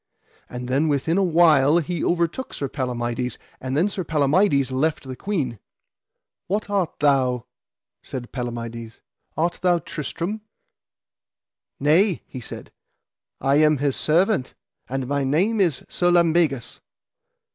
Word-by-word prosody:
And 125 Hz, 0 st, -6 dB
then 135 Hz, +5 st, +1 dB
within 155 Hz, +5 st, +1 dB
a -, -, +3 dB
while 160 Hz, -4 st, +5 dB
he 175 Hz, 0 st, -2 dB
overtook 170 Hz, +9 st, -1 dB
Sir 140 Hz, -, -2 dB
Palamides. 125 Hz, -2 st, -3 dB, 0.2 s
And 130 Hz, +2 st, -3 dB
then 175 Hz, +6 st, +3 dB
Sir 195 Hz, -2 st, -3 dB
Palamides 150 Hz, -2 st, +2 dB
left 155 Hz, +4 st, 0 dB
the 130 Hz, -, -5 dB
queen. 135 Hz, -, -3 dB, 0.9 s
What 205 Hz, +2 st, -2 dB
art 190 Hz, -5 st, 0 dB
thou, 130 Hz, -4 st, +2 dB, 0.6 s
said 125 Hz, -2 st, -7 dB
Palamides, 115 Hz, -2 st, -6 dB, 0.4 s
art 170 Hz, +2 st, 0 dB
thou 180 Hz, -1 st, +3 dB
Tristram? 170 Hz, +6 st, -4 dB, 1.4 s
Nay, 165 Hz, +6 st, +3 dB
he 130 Hz, -, -8 dB
said, -, -, -9 dB, 0.7 s
I 135 Hz, +1 st, +3 dB
am 155 Hz, 0 st, +4 dB
his 140 Hz, -1 st, 0 dB
servant, 170 Hz, -, +1 dB, 0.3 s
and 135 Hz, 0 st, -2 dB
my 140 Hz, +1 st, 0 dB
name 180 Hz, +12 st, +1 dB
is 165 Hz, -8 st, +1 dB
Sir 175 Hz, -, +1 dB
Lambegus. 165 Hz, -7 st, +2 dB
150 Hz, 125 wpm, -23 LUFS, 130-175 Hz, 1.4 s, while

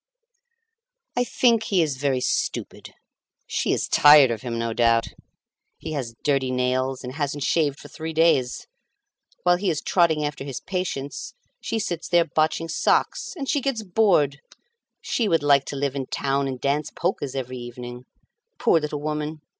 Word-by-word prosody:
"I 245 Hz, -, +2 dB
think 235 Hz, -2 st, +2 dB
he 185 Hz, -4 st, +2 dB
is 145 Hz, -4 st, -2 dB
very 135 Hz, -2 st, 0 dB
stupid. -, -, -3 dB, 0.5 s
She -, -, -1 dB
is -, -, 0 dB
tired 145 Hz, -3 st, +7 dB
of 115 Hz, -, -3 dB
him, 120 Hz, -2 st, -4 dB
no 115 Hz, 0 st, -2 dB
doubt. 115 Hz, 0 st, +2 dB, 0.7 s
He 160 Hz, -, -7 dB
has 130 Hz, -6 st, -4 dB
dirty 135 Hz, -3 st, +1 dB
nails, 130 Hz, +1 st, -1 dB
and 125 Hz, 0 st, -6 dB
hasn't 145 Hz, -1 st, -2 dB
shaved 150 Hz, -2 st, +1 dB
for -, -, -11 dB
three 160 Hz, +1 st, -6 dB
days. 160 Hz, -6 st, +2 dB, 0.8 s
While 175 Hz, 0 st, +4 dB
he 190 Hz, +1 st, -1 dB
is 155 Hz, -3 st, 0 dB
trotting 160 Hz, -4 st, +2 dB
after 145 Hz, -2 st, -4 dB
his 135 Hz, -2 st, -5 dB
patients, 180 Hz, -7 st, -4 dB, 0.2 s
she -, -, -3 dB
sits 175 Hz, -6 st, -3 dB
there 175 Hz, -1 st, +4 dB
botching 160 Hz, +1 st, 0 dB
socks. 165 Hz, -, 0 dB
And 275 Hz, -3 st, -4 dB
she 285 Hz, -, +1 dB
gets 260 Hz, -5 st, -2 dB
bored! 180 Hz, -8 st, +2 dB, 0.6 s
She 230 Hz, -, -1 dB
would 165 Hz, -5 st, +2 dB
like 140 Hz, -2 st, +4 dB
to -, -, -5 dB
live 140 Hz, 0 st, -2 dB
in 135 Hz, -2 st, -3 dB
town 140 Hz, 0 st, -1 dB
and 130 Hz, -2 st, -4 dB
dance 140 Hz, +2 st, 0 dB
polkas 135 Hz, -2 st, -2 dB
every 130 Hz, -1 st, -4 dB
evening. 120 Hz, +1 st, -8 dB, 0.5 s
Poor 170 Hz, -8 st, +3 dB
little 150 Hz, -1 st, -4 dB
woman! 150 Hz, 0 st, -3 dB
145 Hz, 165 wpm, -24 LUFS, 130-165 Hz, 0.8 s, tired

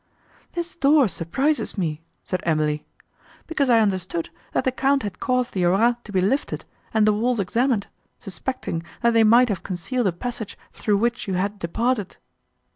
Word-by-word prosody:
"This 345 Hz, 0 st, -4 dB
door 285 Hz, -4 st, +5 dB
surprises 245 Hz, -, -1 dB
me," 160 Hz, -4 st, -2 dB, 0.2 s
said 185 Hz, -, -2 dB
Emily, 155 Hz, -2 st, 0 dB, 0.6 s
"because 285 Hz, -5 st, 0 dB
I 230 Hz, -2 st, +6 dB
understood, 185 Hz, -5 st, -1 dB, 0.2 s
that -, -, +1 dB
the 260 Hz, -, +1 dB
Count 270 Hz, +1 st, +1 dB
had 200 Hz, -3 st, -5 dB
caused 250 Hz, -1 st, 0 dB
the 185 Hz, -, 0 dB
arras 200 Hz, +7 st, +4 dB
to 210 Hz, -, -9 dB
be 190 Hz, -2 st, +2 dB
lifted, 240 Hz, +10 st, 0 dB, 0.3 s
and 220 Hz, -1 st, +3 dB
the 215 Hz, -, +5 dB
walls 235 Hz, +2 st, +1 dB
examined, 230 Hz, +3 st, +1 dB, 0.3 s
suspecting, 195 Hz, -3 st, -4 dB, 0.2 s
that 235 Hz, -, +5 dB
they 225 Hz, -1 st, +5 dB
might 235 Hz, +3 st, +6 dB
have 195 Hz, -4 st, -1 dB
concealed 200 Hz, +6 st, -2 dB
a -, -, +2 dB
passage 220 Hz, +3 st, -5 dB, 0.2 s
through 210 Hz, -2 st, +1 dB
which 235 Hz, +2 st, 0 dB
you 190 Hz, -, -1 dB
had 200 Hz, +3 st, -1 dB
departed." 210 Hz, +4 st, -1 dB
215 Hz, 170 wpm, -23 LUFS, 185-250 Hz, 0.6 s, I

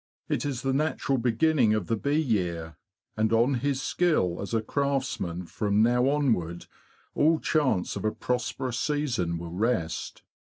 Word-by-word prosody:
It -, -, -1 dB
is 130 Hz, -4 st, -3 dB
the 135 Hz, 0 st, +1 dB
natural 140 Hz, -2 st, 0 dB
beginning 120 Hz, -1 st, +3 dB
of 105 Hz, -4 st, -1 dB
the 115 Hz, -, 0 dB
bee 140 Hz, +7 st, 0 dB
year, 85 Hz, -, -1 dB, 0.4 s
and 110 Hz, 0 st, +1 dB
on 120 Hz, +4 st, +3 dB
his 135 Hz, +1 st, -1 dB
skill 155 Hz, -, +1 dB
as 100 Hz, -, -5 dB
a 115 Hz, -1 st, 0 dB
craftsman 125 Hz, -10 st, -2 dB
from 105 Hz, +4 st, +1 dB
now 125 Hz, +3 st, +3 dB
onward 110 Hz, -, 0 dB, 0.5 s
all 160 Hz, +2 st, +3 dB
chance 140 Hz, -, +1 dB
of -, -, -5 dB
a 110 Hz, -, +1 dB
prosperous 125 Hz, +1 st, -2 dB
season 125 Hz, -, -1 dB
will 85 Hz, 0 st, -7 dB
rest. 95 Hz, -5 st, -2 dB
120 Hz, 155 wpm, -27 LUFS, 100-140 Hz, 0.5 s, beginning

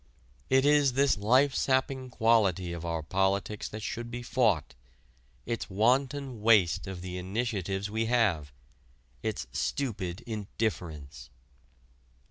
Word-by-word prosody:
It 130 Hz, +1 st, +4 dB
is 145 Hz, -3 st, +4 dB
this 140 Hz, +1 st, +3 dB
life 130 Hz, +7 st, +3 dB
sapping 130 Hz, -1 st, 0 dB
quality 105 Hz, -8 st, +2 dB
of 85 Hz, -1 st, -6 dB
our 85 Hz, -2 st, -2 dB
politics 95 Hz, +4 st, 0 dB
that 110 Hz, 0 st, -7 dB
should 120 Hz, +1 st, -4 dB
be 120 Hz, 0 st, -6 dB
fought 110 Hz, -, +1 dB, 0.7 s
its 115 Hz, -3 st, -3 dB
wanton 130 Hz, +4 st, +1 dB
waste 105 Hz, -6 st, +4 dB
of 95 Hz, -2 st, -6 dB
the 90 Hz, 0 st, -5 dB
initiatives 100 Hz, -1 st, -2 dB
we 110 Hz, +2 st, -1 dB
have 100 Hz, -12 st, +1 dB, 0.7 s
its 105 Hz, -, -3 dB
stupid 100 Hz, -, -3 dB
indifference. 90 Hz, -, -4 dB
110 Hz, 115 wpm, -29 LUFS, 90-125 Hz, 0.7 s, It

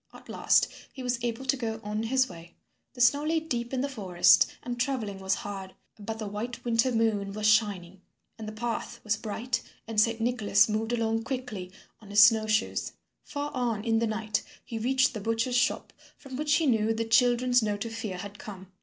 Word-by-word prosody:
At -, -, -15 dB
last -, -, +3 dB, 0.2 s
he 260 Hz, -, -8 dB
was 245 Hz, -1 st, -2 dB
able 240 Hz, +2 st, -2 dB
to 265 Hz, -, +2 dB
go 225 Hz, -3 st, -3 dB
on 210 Hz, +1 st, -2 dB
his 260 Hz, +3 st, +2 dB
way. 170 Hz, -1 st, -12 dB, 0.4 s
The 245 Hz, -, -5 dB
snow 285 Hz, +5 st, +5 dB
lay 320 Hz, +1 st, +1 dB
deep 240 Hz, -7 st, -3 dB
in 260 Hz, -1 st, -1 dB
the 280 Hz, -, 0 dB
forest, 195 Hz, -10 st, +4 dB, 0.2 s
and 240 Hz, -1 st, -5 dB
travelling 240 Hz, -7 st, -2 dB
was 190 Hz, 0 st, 0 dB
hard, 195 Hz, -2 st, -7 dB, 0.2 s
but 220 Hz, +2 st, -5 dB
the 220 Hz, -, -5 dB
white 215 Hz, +5 st, -5 dB
winter 235 Hz, +2 st, +2 dB
moon 215 Hz, -4 st, 0 dB
was 215 Hz, 0 st, -3 dB
shining, 200 Hz, -4 st, +2 dB, 0.3 s
and 220 Hz, -1 st, -8 dB
the -, -, -4 dB
path 230 Hz, +2 st, -4 dB
was 215 Hz, 0 st, +1 dB
bright 225 Hz, +3 st, -3 dB, 0.3 s
and 220 Hz, -2 st, +2 dB
Saint 230 Hz, +1 st, +1 dB
Nicholas 225 Hz, -4 st, +3 dB
moved 220 Hz, +1 st, -1 dB
along 225 Hz, -1 st, 0 dB
quickly 225 Hz, -7 st, -5 dB, 0.3 s
on 210 Hz, -, -15 dB
his 205 Hz, +1 st, +7 dB
snow 220 Hz, 0 st, +5 dB
shoes. 215 Hz, 0 st, 0 dB, 0.3 s
Far 290 Hz, 0 st, -5 dB
on 235 Hz, -5 st, -1 dB
in 225 Hz, -1 st, +2 dB
the 230 Hz, -, +1 dB
night 215 Hz, 0 st, -1 dB, 0.2 s
he 225 Hz, -, -5 dB
reached 260 Hz, +3 st, +2 dB
the 215 Hz, -, -5 dB
butcher's 230 Hz, +3 st, 0 dB
shop 245 Hz, +2 st, +1 dB, 0.2 s
from 270 Hz, -2 st, -10 dB
which 295 Hz, +1 st, +1 dB
he 320 Hz, 0 st, +2 dB
knew 225 Hz, -4 st, +2 dB
the 230 Hz, 0 st, -1 dB
children's 245 Hz, +2 st, +4 dB
note 210 Hz, 0 st, -2 dB
of 225 Hz, -, -6 dB
fear 210 Hz, -5 st, -4 dB
had 200 Hz, +2 st, -8 dB
come. 190 Hz, -2 st, -10 dB
225 Hz, 205 wpm, -28 LUFS, 210-245 Hz, 0.4 s, his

